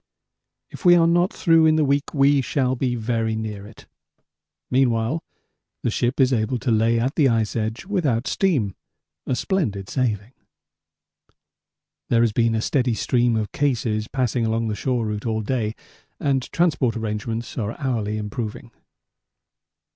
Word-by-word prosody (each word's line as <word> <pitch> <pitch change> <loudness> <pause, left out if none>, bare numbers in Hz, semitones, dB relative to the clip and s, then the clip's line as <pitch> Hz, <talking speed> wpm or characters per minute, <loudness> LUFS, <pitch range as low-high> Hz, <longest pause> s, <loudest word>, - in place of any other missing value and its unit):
If - - -11
we 175 -2 +7
are 170 -1 +5
not 175 +3 +3
through 165 -2 +4
in 155 - +4
the 155 -1 +3
week 140 +1 0
we 140 -1 +4
shall 130 0 0
be 125 -1 -1
very 115 -1 -1
near 105 -2 -5
it. 110 - -15 0.9
Meanwhile 125 +3 +1 0.6
the 120 - +1
ship 120 +4 -1
is 130 -1 +4
able 115 +2 0
to 120 0 -1
lay 115 +1 +3
at 130 +4 0
the 150 -4 +3
ice 115 -2 0
edge 110 - -3
without 150 - 0
steam; 135 - +1 0.5
a 130 - +1
splendid 110 - -2
saving. 115 -2 -2 1.8
There 115 - +3
has 115 -2 +3
been 115 0 +2
a 110 - -1
steady 125 -4 +1
stream 120 0 +1
of 105 -3 -2
cases 115 -6 0
passing 125 -3 -1
along 115 0 0
the 105 - -2
shore 125 -1 -1
route 105 +1 -3
all 110 -1 -1
day 110 -1 -2 0.4
and 135 -2 -1
transport 150 -9 +1
arrangements 110 +1 -4
are 110 0 -4
hourly 115 -6 -1
improving. 105 +1 -5
120 Hz, 155 wpm, -23 LUFS, 110-135 Hz, 1.8 s, we